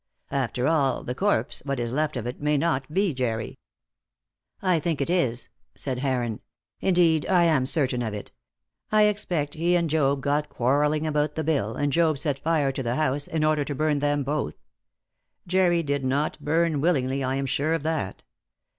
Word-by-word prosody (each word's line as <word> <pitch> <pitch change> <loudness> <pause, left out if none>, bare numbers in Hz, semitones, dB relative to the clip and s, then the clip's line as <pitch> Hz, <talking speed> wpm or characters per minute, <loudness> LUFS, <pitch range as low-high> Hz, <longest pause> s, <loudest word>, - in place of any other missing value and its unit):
After 130 -2 -1
all, 145 -3 +1
the 125 - -3
corpse 200 +10 0
what 140 -2 -2
is 120 0 -2
left 150 0 0
of 120 - -4
it 125 +3 -5
may 150 0 +2
not 140 -3 0
be 190 0 +1
Jerry!" 115 -4 -3 1.0
"I 185 -4 +2
think 160 -1 -1
it 140 +4 -1
is," 125 -10 0 0.3
said 130 -3 -1
Heron. 125 -5 -1 0.4
"Indeed, 170 -4 +3
I 180 -2 +4
am 155 -6 +3
certain 130 -5 +1
of 115 -2 -2
it. 105 - -7 0.6
I 215 0 +5
expect 180 -8 0
he 170 +2 +1
and 170 -1 +2
Job 140 -3 +2
got 145 +1 0
quarrelling 145 +5 +1
about 150 -1 0
the 160 - -2
bill, 140 -9 0
and 145 -1 -1
Job 160 -3 +3
set 145 -1 -2
fire 155 -3 +1
to 135 - -4
the 120 -1 -1
house 145 -1 0
in 160 -1 -1
order 155 -1 +2
to 145 0 -4
burn 150 +1 +1
them 145 0 +1
both. 140 - -2 0.9
Jerry 175 -2 +2
did 145 -2 -1
not 140 +4 -1
burn 160 -1 +1
willingly, 135 -5 +1
I 130 0 0
am 135 0 -1
sure 145 +4 0
of 165 - -4
that. 155 -11 -2
145 Hz, 185 wpm, -25 LUFS, 135-160 Hz, 1.0 s, I